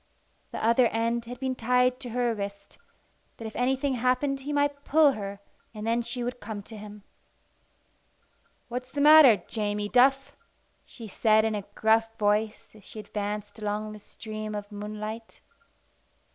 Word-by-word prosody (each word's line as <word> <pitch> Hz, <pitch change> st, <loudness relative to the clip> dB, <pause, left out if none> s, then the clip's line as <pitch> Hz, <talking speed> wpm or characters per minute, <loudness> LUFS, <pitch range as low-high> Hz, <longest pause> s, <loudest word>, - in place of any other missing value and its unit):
The -, -, -4 dB
other 235 Hz, +2 st, +5 dB
end 230 Hz, +1 st, -1 dB
had 245 Hz, +1 st, -8 dB
been 260 Hz, -1 st, -1 dB
tied 250 Hz, +1 st, +2 dB
to 250 Hz, -, -7 dB
her 240 Hz, 0 st, 0 dB
wrist, 200 Hz, -1 st, -7 dB, 0.6 s
that 225 Hz, -, -8 dB
if 220 Hz, -, -7 dB
anything 265 Hz, +2 st, 0 dB
happened 255 Hz, +3 st, 0 dB
he 280 Hz, +2 st, -6 dB
might 285 Hz, -1 st, 0 dB
pull 300 Hz, 0 st, +5 dB
her, 200 Hz, -4 st, -6 dB, 0.4 s
and 210 Hz, 0 st, -6 dB
then 230 Hz, +1 st, +1 dB
she 245 Hz, +1 st, -4 dB
would 245 Hz, +1 st, -4 dB
come 205 Hz, -2 st, -7 dB
to 220 Hz, -, -10 dB
him. 210 Hz, -1 st, -10 dB, 1.6 s
"What's 250 Hz, +2 st, -6 dB
the 285 Hz, -, -4 dB
matter, 285 Hz, -, +8 dB
Jamie 210 Hz, -1 st, -2 dB
Duff?" 270 Hz, +3 st, +3 dB, 0.5 s
she 230 Hz, -3 st, -11 dB
said 215 Hz, +2 st, +3 dB
in 220 Hz, -, 0 dB
a 205 Hz, -2 st, -4 dB
gruff 225 Hz, +1 st, +2 dB
voice 210 Hz, +1 st, 0 dB
as 215 Hz, -2 st, -17 dB
she 215 Hz, -, -10 dB
advanced 210 Hz, 0 st, -5 dB
along 210 Hz, 0 st, -3 dB
the 215 Hz, -, -10 dB
stream 215 Hz, 0 st, -7 dB
of 205 Hz, 0 st, -6 dB
moonlight. 215 Hz, +2 st, -7 dB
225 Hz, 160 wpm, -27 LUFS, 210-250 Hz, 1.6 s, matter